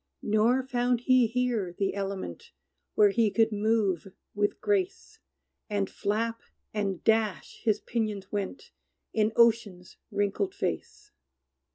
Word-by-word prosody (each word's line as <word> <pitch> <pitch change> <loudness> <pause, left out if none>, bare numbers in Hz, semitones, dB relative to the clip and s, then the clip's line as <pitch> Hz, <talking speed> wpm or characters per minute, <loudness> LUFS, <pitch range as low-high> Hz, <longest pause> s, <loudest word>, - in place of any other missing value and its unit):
Nor 225 +5 +3
found 245 -2 0
he 255 -1 +4
here 230 -6 -1
the 195 -1 0
element 195 - -5 0.5
Where 205 -1 +6
he 225 +1 +3
could 225 +2 +2
move 210 -4 +1 0.3
with 205 0 0
grace; 390 -2 -1 0.5
And 200 -2 -1
flap, 225 +3 -1 0.3
and 200 -4 -2
dash, 220 -3 0
his 215 -3 +1
pinions 210 -4 -3
went, 205 +5 -4 0.4
In 215 0 +2
ocean's 220 -6 +2
wrinkled 205 - -1
face. 415 +1 -4
215 Hz, 115 wpm, -28 LUFS, 200-240 Hz, 0.5 s, Where